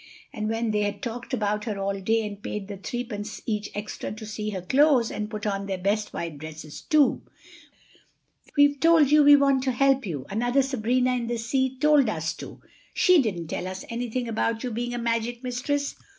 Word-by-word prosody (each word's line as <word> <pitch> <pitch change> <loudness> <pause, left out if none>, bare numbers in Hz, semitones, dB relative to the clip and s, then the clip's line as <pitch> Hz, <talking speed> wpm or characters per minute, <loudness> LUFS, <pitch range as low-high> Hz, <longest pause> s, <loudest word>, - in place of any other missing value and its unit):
And 215 0 -3
when 225 0 -1
they 210 - +1
had 205 -1 -2
talked 240 +2 -5
about 210 -4 -1
her 215 -4 -3
all 195 0 -2
day 225 +3 +1
and 205 -1 -7
paid 205 -1 -5
the 200 -1 -7
threepence 215 0 -5
each 210 -2 -2
extra 210 +1 -5
to 220 +1 -8
see 215 0 -4
her 190 -4 -5
close, 265 +2 +3
and 210 0 -4
put 215 -1 -6
on 200 -1 -2
their 190 -1 -2
best 205 +3 -1
white 165 -4 -5
dresses 155 0 -9
too. 300 -3 +3 1.4
"We've 285 0 +5
told 325 -3 +5
you—we 290 -1 +8
want 275 -2 +3
to 260 - +2
help 270 -1 +2
you. 145 -7 -4
Another 245 +6 +1
Sabrina 255 0 +1
in 240 -2 -2
the 240 0 -1
sea 260 +3 -1
told 290 -3 +4
us 160 -4 -2
to. - - -10 0.3
She 365 -4 +5
didn't 175 -9 -3
tell 180 - -3
us 185 0 -6
anything 240 +1 -3
about 225 +1 -1
you 250 - -3
being 240 +2 -3
a - - -3
magic 235 +1 -2
mistress. 280 +3 -2
225 Hz, 195 wpm, -26 LUFS, 205-255 Hz, 1.4 s, you—we